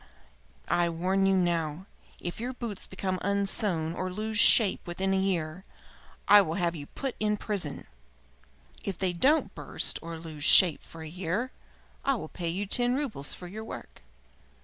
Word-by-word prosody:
I 175 0 +2
warn 185 +4 +1
you 195 - +4
now 170 -1 0 0.3
if 175 +3 -5
your 245 +3 -3
boots 230 -5 -6
become 190 -1 -3
unsewn 195 -4 0
or 185 +1 -3
lose 215 +3 -2
shape 220 -3 +6
within 190 +3 -1
a 190 - +2
year, 180 -2 -1 0.6
I 205 0 +9
will 165 -4 -2
have 175 -3 0
you 145 -2 -7
put 270 -3 -5
in 210 0 +1
prison. 195 -9 -3 1.0
If 195 -3 -4
they 185 -2 0
don't 280 - +2
burst - - 0
or 165 0 -6
lose 160 -2 -8
shape 170 0 +7
for 165 -1 -10
a - - -7
year 185 +9 -3 0.5
I 275 - +2
will 160 -9 -6
pay 170 -2 -4
you 190 +5 -2
ten 245 +4 +2
roubles 245 - -1
for 180 - -10
your 215 +5 -7
work." 220 - -9
185 Hz, 170 wpm, -28 LUFS, 170-210 Hz, 1.0 s, I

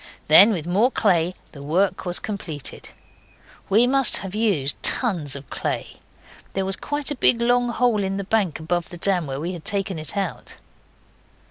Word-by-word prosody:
Then 195 +8 +8
with 170 -7 -3
more 200 +8 +2
clay 180 -7 +1 0.2
the 140 - -11
work 185 +6 0
was 175 - 0
completed. 165 -9 -6 0.8
We 220 +5 +5
must 270 0 +2
have 195 -1 -7
used 200 -11 0
tons 175 - +1
of 140 -2 -9
clay; - - -4 0.6
there 190 0 -1
was 195 0 0
quite 290 +5 -2
a - - -2
big 235 -1 +5
long 245 +1 +2
hole 235 -3 +1
in 195 0 -2
the 200 - -3
bank 195 -6 0
above 175 +2 -2
the 175 - -9
dam 180 -3 0
where 135 0 -4
we 170 +4 -4
had 170 -3 -9
taken 195 -4 -2
it 155 +6 -6
out. 195 -4 -4
195 Hz, 175 wpm, -22 LUFS, 165-220 Hz, 0.8 s, Then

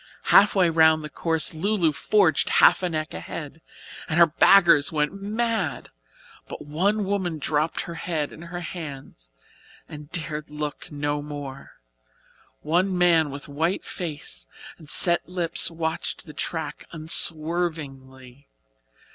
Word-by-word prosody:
Half 205 +1 +6
way 185 -3 +4
round 160 -1 +4
the 150 - -8
course 160 +2 -1
"Lu 200 +7 -1
Lu" 170 -6 +2
forged 175 +1 +2
half - - +5
a 180 - -1
neck 155 -1 -4
ahead, 160 +1 -8 0.5
and 155 - -1
her 170 - +8
backers 170 -2 +5
went 150 +1 -1
mad. 220 0 -2 0.6
But - - -9
one 195 +8 0
woman 190 -4 -2
dropped 150 +2 -1
her 170 - -7
head 165 -3 -3
in - - -12
her 175 +1 -7
hands 140 - -9 0.6
and 150 0 -11
dared 155 -3 -2
look 150 -1 -6
no 145 0 -2
more. 145 -2 -8 0.9
One 180 +4 0
man 170 -4 +3
with 140 +1 -8
white 160 +6 -2
face 145 - -6 0.3
and 155 -3 -13
set 170 +1 +4
lips 175 -2 +1
watched 160 -1 -4
the 155 - -11
track 155 -1 -5
unswervingly. 155 -5 -1
160 Hz, 135 wpm, -24 LUFS, 150-175 Hz, 0.9 s, her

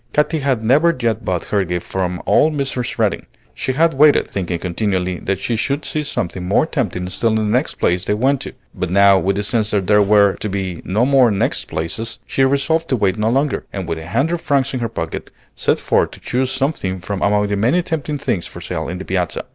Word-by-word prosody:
Katy 150 +2 +1
had 135 -5 0
never 150 +8 +3
yet 115 -2 0
bought 90 -3 -2
her 100 -2 +3
gift 90 -1 -3
from 90 -2 -3
old 155 +1 +3
Mrs. 135 -4 -2
Redding. - - 0 0.3
She 130 - -2
had 165 +4 +3
waited, 145 +2 +4
thinking 90 -3 -2
continually 90 0 -2
that 100 0 -2
she 115 +4 -1
should 140 +6 -1
see 155 - -2
something 95 - -3
more 95 +10 +2
tempting 100 - -2
still 115 +5 +1
in 110 - +1
the 110 - +1
next 120 +7 0
place 90 0 +1
they 105 - +1
went 135 +4 +1
to; - - -6 0.2
but 90 -1 -3
now, 100 +1 +5
with 95 +1 0
the 105 - -1
sense 110 0 0
that 100 -3 0
there 105 +2 +4
were 100 -1 +4
to 105 - -4
be 95 -3 -3
no 110 +6 +1
more 135 -3 +5
"next 100 -2 0
places," 85 +9 -4
she 135 - 0
resolved 140 +5 +1
to 130 - +2
wait 100 -3 0
no 110 +1 +2
longer, 135 +4 0
and 95 -3 -5
with 80 -1 -3
a 80 - -9
hundred 145 - 0
francs 140 -1 +1
in 130 - -2
her 115 -1 -2
pocket, 80 -7 -5 0.3
set - - +1
forth - - +1
to - - -13
choose 130 +1 -1
something 130 -9 -1
from 95 +2 -5
among 105 +1 +2
the 100 0 -1
many 125 - +2
tempting 155 -3 -3
things 120 -10 -2
for - - -10
sale - - -4
in 90 - -4
the 95 - -7
Piazza. 90 -3 -2
110 Hz, 230 wpm, -19 LUFS, 95-135 Hz, 0.3 s, now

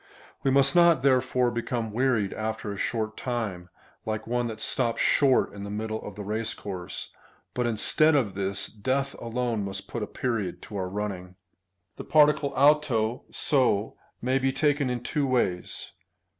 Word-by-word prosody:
We 135 - +1
must 140 +4 +4
not 170 -5 +5
therefore 125 -2 +3
become 120 -1 -3
wearied 115 -4 +1
after 110 -1 -3
a - - -5
short 110 +1 -2
time, 105 -8 -3 0.3
like 110 0 -3
one 120 +1 0
that 110 -1 -6
stops 120 -1 0
short 135 -3 +3
in 100 0 -7
the 100 - -6
middle 110 +1 -3
of 105 - -8
the 105 - -6
race 110 +2 -3
course, 95 -3 -6 0.4
but 125 -1 0
instead 150 +7 +3
of 115 -9 +1
this, 95 0 -1
death 130 +6 -2
alone 115 -2 -1
must 95 0 -5
put 120 - -5
a 105 - -2
period 115 -8 -2
to 105 - -9
our 95 -2 -2
running. 95 -2 -5 0.6
The - - -6
particle 150 -2 +4
ovt(o, 135 -5 +3
(so,) 125 -7 +1 0.3
may 130 +2 +2
be 135 0 +1
taken 145 0 +1
in 125 -1 -3
two 145 +1 0
ways. 100 -9 -1
115 Hz, 165 wpm, -27 LUFS, 105-130 Hz, 0.6 s, not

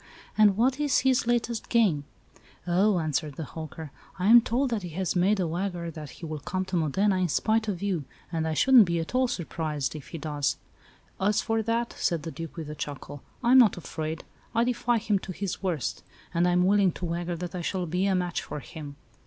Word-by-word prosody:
And 205 -2 +5
what 260 +4 +2
is 295 -2 +2
his 260 -2 +2
latest 235 -1 0
game?" 195 - +3 0.6
"Oh," 185 +3 +3
answered 155 -2 -1
the 160 - -5
hawker, 155 0 -8 0.3
"I 185 - -2
am 240 +1 +9
told 250 +3 0
that 225 -3 0
he 180 - -6
has 190 -2 -1
made 195 +3 +3
a 180 - +1
wager 175 0 -3
that 150 -2 -8
he 170 - -10
will 155 -1 -5
come 185 +6 -3
to 185 - -4
Modena, 185 +5 +2
in 185 -1 +1
spite 220 +7 +1
of 195 -3 -3
you; 180 -8 -1 0.3
and 160 -2 -1
I 160 - -1
shouldn't 255 - +7
be 170 -1 -1
at 165 - -5
all 255 0 +3
surprised 155 - -3
if 150 - -8
he 165 - -7
does!" 150 -2 -1 0.6
"As 205 +2 +2
for 225 -1 0
that," 230 +2 -1
said 170 -4 0
the 165 - -5
Duke, 165 -1 -7
with 155 -2 -5
a - - -4
chuckle, 145 -1 -7 0.2
"I 240 - +3
am 260 - +9
not 225 -7 +5
afraid. 160 -1 -5 0.3
I 230 - +4
defy 240 0 +1
him 210 -2 +1
to 190 - -7
do - - -10
his 195 -2 -3
worst; 175 -8 -2 0.3
and 170 +1 +3
I - - +3
am 180 0 +3
willing 195 -2 +4
to 180 - -5
wager 170 +1 -2
that 175 0 -6
I 180 - -3
shall 180 +1 -2
be 180 +4 0
a 195 - +2
match 180 -2 -1
for - - -6
him. 145 0 -9
180 Hz, 225 wpm, -27 LUFS, 160-215 Hz, 0.6 s, am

